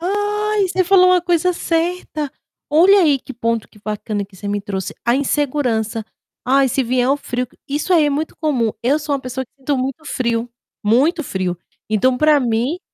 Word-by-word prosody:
Ai, 415 +2 0
você 370 0 +1
falou 365 0 +6
uma 365 -1 +5
coisa 350 +1 +1
certa, 330 -4 -2 0.4
olha 370 +6 +6
aí 290 -4 +3
que 265 - -10
ponto 230 -2 -1
que 210 - -20
bacana 210 -1 -3
que 195 -1 -18
você 200 - -8
me 205 0 -1
trouxe, 195 -1 -4
a 235 +1 +3
insegurança, 255 -6 0 0.4
"ai, 270 +1 +4
se 260 +2 0
vier 250 +2 +1
o 280 - +3
frio", 250 -3 -4 0.2
isso 300 +6 -1
aí 320 -3 +5
é 290 - +2
muito 300 +3 -3
comum. 255 -8 +1
Eu 270 +6 +2
sou 295 -1 -2
uma 270 - -8
pessoa 260 +1 -4
que - - -37
sinto 270 +1 -1
muito 270 +4 -3
frio, 235 -4 -1 0.4
muito 285 +9 +2
frio, 185 -4 -2 0.3
então, 250 +4 +2
para 305 +2 +4
mim 245 +6 0
275 Hz, 190 wpm, -19 LUFS, 230-325 Hz, 0.4 s, falou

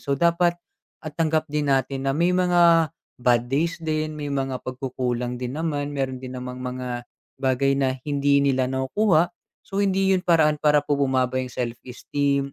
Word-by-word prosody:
So 140 - -2
dapat 170 +1 +2 0.4
at 155 -2 -7
tanggap 160 -1 +1
din 150 -1 -1
natin 135 0 -1
na 135 - +2
may 170 +5 +2
mga 170 -3 +4 0.3
bad 120 0 +2
days 165 +5 0
din, 155 -1 -2
may 145 -1 -4
mga 135 -2 -2
pagkukulangan 125 -1 -3
din 125 +3 -4
naman, 145 -3 -2
meron 130 -2 -2
din 130 0 -7
namang 125 0 -6
mga 125 -1 -4 0.4
bagay 135 0 +2
na 130 -1 0
hindi 140 -1 +2
nila 130 -2 +2
nakukuha. 165 +6 +1 0.3
So 195 0 -3
hindi 195 -1 +2
'yun 185 - +2
paraan 155 -3 +3
para 150 -1 +3
po 145 -1 0
bumaba 130 -2 +1
'yung 130 - -4
self-esteem 135 +3 -2
140 Hz, 170 wpm, -24 LUFS, 130-160 Hz, 0.4 s, mga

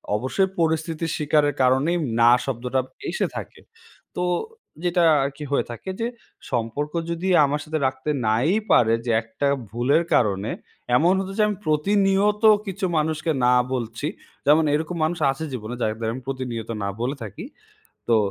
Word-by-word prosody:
অবশ্যই 130 - 0
পরিস্থিতির 160 0 0
স্বীকারের 150 -1 +2
কারণেই 135 +7 +3 0.2
না 120 +1 +7
শব্দটা 125 0 -1 0.3
এসে - - 0
থাকে। - - -7 0.5
তো 180 - -1 0.6
যেটা 175 0 +2 0.2
আরকি 140 +2 -4
হয়ে 140 - +1
থাকে 120 - -8
যে 230 - 0 0.4
সম্পর্ক 125 +5 -2 0.2
যদি 170 +3 -3 0.2
আমার 145 +1 -1
সাথে 155 +1 -3
রাখতে 130 +2 -4 0.2
নাই 115 +8 +2 0.2
পারে 115 -1 +5
যে 120 - 0
একটা 115 +5 -3 0.2
ভুলের 125 - +2
কারণে 105 -2 +1 0.5
এমন 170 +7 +4
হতো 195 0 -4
যে - - +3
আমি 210 -2 -2
প্রতিনিয়ত 195 +6 +2 0.2
কিছু 195 0 -3
মানুষকে 155 +1 0
না 125 - +5 0.2
বলছি 120 +2 -3 0.4
যেমন 150 +3 +5
এরকম 160 +3 -1
মানুষ 165 +2 0
আছে 135 +4 -6
জীবনে 120 -1 -5
যাতে 110 +1 -1
আমি 130 - -7
প্রতিনিয়ত 125 -4 -4
না - - -1
বলে 130 +4 -1
থাকি। 100 -3 -8 0.6
তো 115 - +5
145 Hz, 150 wpm, -23 LUFS, 120-165 Hz, 0.6 s, না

